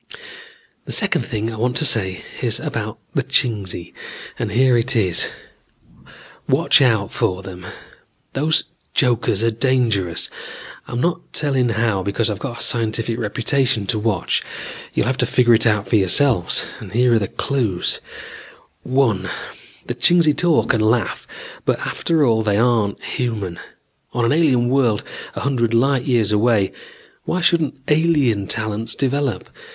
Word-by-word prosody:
"The - - -6
second 190 -5 +1
thing 115 -3 -3
I - - -7
want 120 +2 0
to 155 - +1
say 95 -8 +1 0.2
is - - 0
about - - -4 0.2
the - - +1
Chingsi, 100 -7 -1 0.5
and - - -2
here 125 +3 +3
it 120 +3 +1
is: 95 -6 +1 1.2
watch - - +4
out 110 -6 +2
for 95 +1 -1
them. 90 -1 -9 0.7
Those 155 +3 +1 0.3
jokers 120 -5 +2
are 115 - +2
dangerous. 115 -8 0 0.6
I'm 120 - -4
not 170 +6 -2
telling 135 -5 +1
how 110 -3 0
because 100 +3 0
I've 100 - -5
got 120 -4 -6
a - - +2
scientific 115 0 0
reputation 115 +1 0
to 105 +3 -1
watch. 105 -1 0 0.5
You'll - - +1
have 130 +1 -1
to 125 - +2
figure 120 -1 +4
it 115 +1 +3
out 105 -2 +1
for 110 - +3
yourselves. 100 - +3 0.3
Here 120 +2 +3
are 115 - +4
the 100 - -2
clues: 115 -10 -1 0.8
(1) 115 -8 0 0.6
The - - -3
Chingsi 170 -4 +4
talk 175 -6 +2
and 115 - +1
laugh 110 +2 0 0.4
but - - +1
after 160 -3 0
all 110 -3 +2
they 105 -2 +1
aren't 115 -3 +1
human. 105 -8 -3 0.5
On 120 -1 0
an - - +2
alien 140 -6 +3
world 125 -5 +1 0.3
a - - -4
hundred 120 -5 0
light 130 +1 +2
years 115 -5 +1
away, 105 -2 +2 0.5
why 180 - -1
shouldn't 165 -4 +2
alien 150 - +2
talents 110 0 -2
develop? 140 -1 -1
115 Hz, 145 wpm, -20 LUFS, 105-130 Hz, 1.2 s, watch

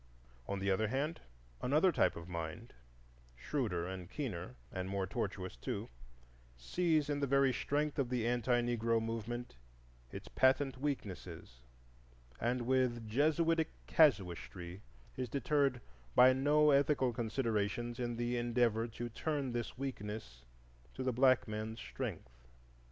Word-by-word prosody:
On 100 - -2
the 100 0 0
other 110 +3 +2
hand, 140 +8 -2 0.4
another 155 +8 +4
type - - +2
of 85 0 -8
mind, 85 +6 -5 0.6
shrewder 90 - -2
and 95 -2 -6
keener 90 - -4 0.2
and 95 0 -4
more 100 -1 -1
tortuous 90 - -3
too, - - -4 0.7
sees 155 - +1
in 145 -1 -1
the 140 - 0
very 135 -1 +4
strength 150 +3 -1
of 130 -3 +1
the 125 -3 0
anti 120 0 +2
Negro 115 -1 +1
movement 115 - -4 0.5
its - - -8
patent 130 0 +2
weaknesses, 95 - -4 0.8
and 120 +1 0
with 120 -2 +1
Jesuitic 160 +6 +2 0.2
casuistry 90 - +2 0.4
is 130 -2 -2
deterred 140 -1 +1 0.3
by 130 +1 +8
no 150 +3 +4
ethical 140 -3 +3
considerations 115 0 -1
in 120 -1 -2
the 120 +1 -1
endeavor 120 -1 +1
to 120 +1 -5
turn 140 +2 -2
this 120 0 -4
weakness 105 - -6 0.5
to 130 - -3
the 130 -1 0
black 130 0 +4
man's 110 +1 -4
strength. - - -6
120 Hz, 130 wpm, -35 LUFS, 105-135 Hz, 0.8 s, by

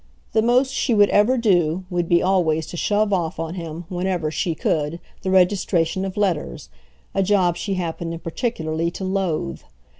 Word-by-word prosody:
The 220 - +3
most 250 +4 +2
she 240 - +1
would 205 -1 +5
ever 220 +6 +4
do 185 -6 +2
would 175 -1 -1
be 170 0 +4
always 165 -4 +2
to 175 - -8
shove 205 +3 +1
off 170 -3 -1
on 165 0 -3
him 165 -1 -6
whenever 180 -3 -2
she 165 +1 -1
could 155 +2 -1 0.2
the 190 - -2
registration 185 -1 +2
of 190 0 -6
letters, 175 - -1 0.4
a - - +1
job 185 -3 +2
she 195 +1 -3
happened 165 -1 -4
particularly 165 -4 -2
to 180 - -7
loathe. 185 - -2
180 Hz, 170 wpm, -22 LUFS, 165-195 Hz, 0.4 s, would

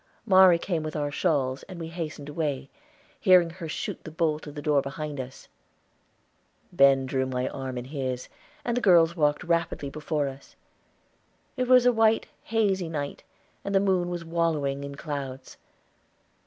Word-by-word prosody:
Mari 190 -4 +7
came 170 -1 -2
with 155 0 -5
our 145 -1 -1
shawls, 140 -5 0
and 185 -2 -8
we 165 -1 -5
hastened 160 -4 -6
away, 145 -3 -3 0.5
hearing 180 -4 +5
her 170 -2 -7
shoot - - -4
the - - -7
bolt 155 -1 -1
of 145 - -9
the 145 - -5
door 145 -2 +3
behind 145 +1 -5
us. 130 0 -8 1.3
Ben 135 -1 +5
drew 130 0 -1
my 130 0 -2
arm 130 -2 -5
in 120 - -5
his, 130 -3 -4 0.4
and 240 - 0
the 245 - 0
girls 170 -5 +5
walked 150 -2 +1
rapidly 165 -4 -1
before 150 -1 -2
us. 135 0 -10 1.0
It 255 -2 -1
was 250 -1 +6
a 245 - +5
white, 225 0 +3 0.2
hazy 195 -6 +1
night, 145 -3 -4 0.4
and 200 0 -2
the - - +6
moon 185 -3 +1
was 175 -1 -4
wallowing 155 -5 0
in 140 0 -6
clouds. 140 -3 -6
155 Hz, 165 wpm, -27 LUFS, 140-175 Hz, 1.3 s, Mari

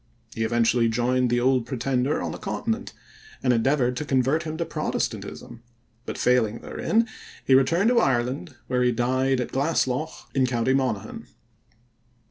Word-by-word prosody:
He - - -5
even 115 +1 +2
joined 120 +2 +2
the 120 +1 +2
Old 125 -1 +2
Pretender 130 +2 -1
on - - -3
the - - -7
continent, 230 +1 -3 0.5
and 125 - +3
endeavored 125 +1 +2
to - - -2
convert 135 +2 +1
him 160 -1 -5
to 170 - -1
Protestantism, 155 -6 -4 0.5
but, - - -4
failing 120 -3 +2
therein, 230 +1 0 0.4
he 135 - +4
returned 165 - +4
to 245 -1 +4
Ireland, 130 - 0
where 125 -1 0
he 125 0 +3
died 130 +2 +1
at 125 - -3
Glasslough 140 0 -1
in 130 -1 +2
county 125 +1 +1
Monaghan. 130 -7 -2
130 Hz, 150 wpm, -25 LUFS, 120-145 Hz, 0.5 s, he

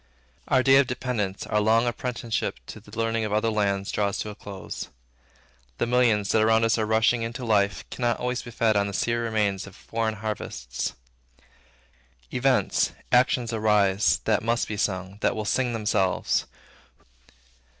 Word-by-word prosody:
Our 130 -1 +3
day 135 0 +6
of 140 -2 +4
dependence, 120 -6 -3
our 105 - +1
long 115 +2 +3
apprenticeship 120 -1 -2
to - - -9
the 105 +2 -14
learning 115 0 0
of 105 - -3
other 110 +2 +1
lands, 100 -2 0
draws 100 -1 0
to 105 - -4
a - - -8
close. 100 -2 -7 0.9
The - - +1
millions, 120 -4 +2
that 110 - +3
around 110 +1 +4
us 115 0 +2
are 110 - 0
rushing 110 +2 +3
into 115 +2 -4
life, 100 -3 +1
cannot 120 -2 0
always 125 0 -2
be - - -10
fed 115 -2 +1
on 100 0 +2
the 100 - -5
sere 120 +3 0
remains 105 -4 0
of 100 - -13
foreign 110 -1 -3
harvests. 65 - -4 1.4
Events, 130 0 +2 0.2
actions 125 -1 +3
arise, 105 -2 +2
that - - +2
must 115 +1 0
be 110 - -4
sung, 95 -1 -2
that - - +1
will 110 -1 -3
sing 125 +4 +1
themselves. 105 -4 0
110 Hz, 160 wpm, -25 LUFS, 105-120 Hz, 1.4 s, day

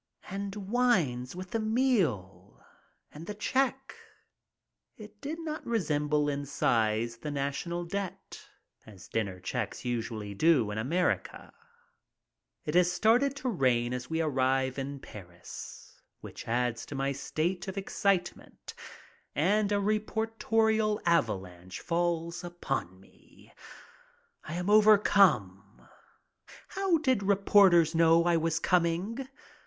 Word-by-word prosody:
And 200 0 -4
wines 190 - 0
with 185 0 -8
the 225 - -1
meal! 165 - -1 0.5
And 160 +3 -10
the 210 - -5
check; 265 +4 -1 1.0
it 210 -1 -13
did 310 +4 -5
not 315 -2 -5
resem 155 -10 -1
ble 150 0 +2
in 145 0 -3
size 115 -3 0
the 150 - -6
national 145 +5 -3
debt, 195 +1 -6 0.4
as 95 -4 -13
dinner 100 -5 -3
checks 115 +6 -4
usually 115 -4 -3
do 125 -2 +3
in 105 - -3
America. 170 +11 -1 1.1
It 150 - -3
has 180 0 +4
started 240 +9 +3
to 260 -2 -3
rain 125 - +1
as 125 0 -5
we 160 0 0
arrive 130 -2 0
in 140 +1 -5
Paris, 90 -7 -11 0.2
which - - -10
adds 120 0 -1
to 145 - -7
my 135 0 -1
state 165 +7 -3
of 190 +1 -6
excitement, 195 -2 -2 0.6
and 200 +6 +2
a - - +3
reportorial 220 +1 0
avalanche 95 - -1
falls 170 0 -2
upon 135 - -4
me. 95 - -22 0.9
I 155 - -6
am 180 +1 -3
about 210 +2 +6
overcome. 175 - +3 0.8
How 390 -4 +1
did 260 -8 +1
reporters 195 -4 +4
know 165 0 +5
I 175 0 +2
was 165 0 0
coming? 180 +10 0
170 Hz, 120 wpm, -29 LUFS, 125-205 Hz, 1.1 s, about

